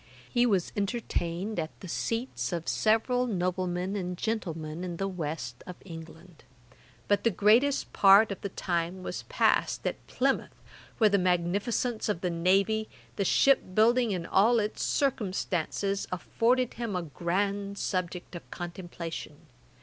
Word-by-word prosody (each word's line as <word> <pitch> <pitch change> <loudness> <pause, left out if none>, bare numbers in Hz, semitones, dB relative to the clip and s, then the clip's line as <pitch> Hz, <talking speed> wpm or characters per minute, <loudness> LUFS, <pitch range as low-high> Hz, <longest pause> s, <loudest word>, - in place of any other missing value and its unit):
He 245 -1 +2
was 195 -6 +1
entertained 200 -2 -2
at 160 -1 -5
the 185 - -9
seats 230 +8 -2
of 170 -2 -3
several 245 +3 +2
noblemen 185 -1 -1
and 180 -2 -3
gentlemen 170 -7 -3
in 175 -2 -4
the 195 - -1
West 155 -9 -5
of 180 - -7
England; 165 -1 -11 0.6
but 205 - +2
the 230 - +4
greatest 230 +8 +3
part 200 +2 +7
of 200 - -5
the 200 - -3
time 175 0 -2
was - - -4
passed - - +2
at - - -3
Plymouth, 270 +1 0 0.4
where 215 -3 +4
the 200 - +4
magnificence 200 +7 0
of 180 -5 -1
the 180 - 0
navy, 195 +6 +2 0.3
the 200 - 0
ship 195 -2 +3
building 235 +1 +4
and 180 -3 -2
all 225 +7 +4
its 210 -1 -1
circumstances, 195 - -1
afforded 240 +7 +1
him 230 -4 -4
a 180 - -1
grand 195 +6 -2
subject 180 -2 -3
of 170 - -9
contemplation. 175 -3 -6
195 Hz, 140 wpm, -29 LUFS, 175-220 Hz, 0.6 s, part